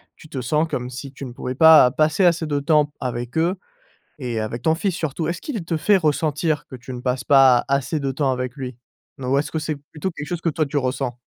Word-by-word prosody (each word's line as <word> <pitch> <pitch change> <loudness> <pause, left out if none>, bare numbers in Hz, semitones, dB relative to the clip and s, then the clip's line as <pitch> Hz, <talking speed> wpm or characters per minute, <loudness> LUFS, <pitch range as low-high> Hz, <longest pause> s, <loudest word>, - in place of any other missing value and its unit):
tu 155 - -16
te 130 - -4
sens 150 +6 +1
comme 125 0 -3
si 130 +2 -8
tu 135 0 -8
ne 125 - -7
pouvais 125 +1 -5
pas 160 -5 +8
passer 155 +5 +2
assez 170 -2 +3
de 145 -1 0
temps 150 +1 +3
p 145 - -20
avec 120 +2 -4
eux 170 +4 +2 0.6
et 120 -4 -3
avec 115 +2 -4
ton 160 - +3
fils 185 +1 -1
surtout. 160 -1 -3
Est-ce 170 0 -3
qu'il 225 - -5
te 165 -1 -1
fait 195 +7 +3
ressentir 155 -1 0
que 130 - -9
tu 125 +2 -10
ne 125 - -6
passes 125 +1 -2
pas, 135 -3 +6
assez 140 +3 0
de 135 -1 -1
temps 135 0 0
avec 125 +2 -4
lui 130 -3 -6 0.4
n 130 - -8
ou 130 +2 +1
est-ce 150 +1 -2
que 160 - -2
c'est 155 -1 -3
plutôt 160 +5 -3
quelque 150 -3 -7
chose 175 -1 -3
que 165 - +1
toi 155 +1 0
tu 145 - -4
ressens? 130 -2 -1
145 Hz, 255 wpm, -22 LUFS, 130-160 Hz, 0.6 s, pas